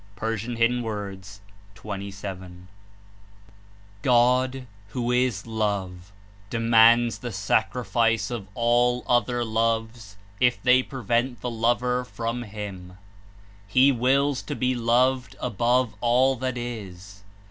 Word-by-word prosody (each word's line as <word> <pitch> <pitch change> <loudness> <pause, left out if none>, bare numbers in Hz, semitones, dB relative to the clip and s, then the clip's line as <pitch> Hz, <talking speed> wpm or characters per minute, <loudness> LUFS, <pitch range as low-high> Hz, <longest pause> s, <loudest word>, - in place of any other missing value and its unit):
(P.27.) 115 +2 -1 0.9
14 100 -1 -6
6 95 -2 -7 1.5
God, 125 +2 +2 0.2
who 120 +2 -2
is 125 -5 0
Love, 100 -4 -3 0.4
demands 115 +1 +4
the 120 - -6
sacrifice 110 +3 0
of 110 -5 -5
all 120 +1 +2
other 120 0 +1
loves 115 -1 -2 0.2
if 125 -1 +2
they 130 0 +5
prevent 120 -1 -2
the 125 - -3
lover 120 +2 0
from 115 -1 -4
Him. 100 -5 -8 0.7
"He 130 +7 +5
wills 135 +2 +1
to 145 - -5
be 130 -1 0
loved 125 +1 +1
above 120 +1 +1
all 125 +3 +3
that 130 0 -3
is." 100 -5 -8
120 Hz, 105 wpm, -25 LUFS, 110-125 Hz, 1.5 s, they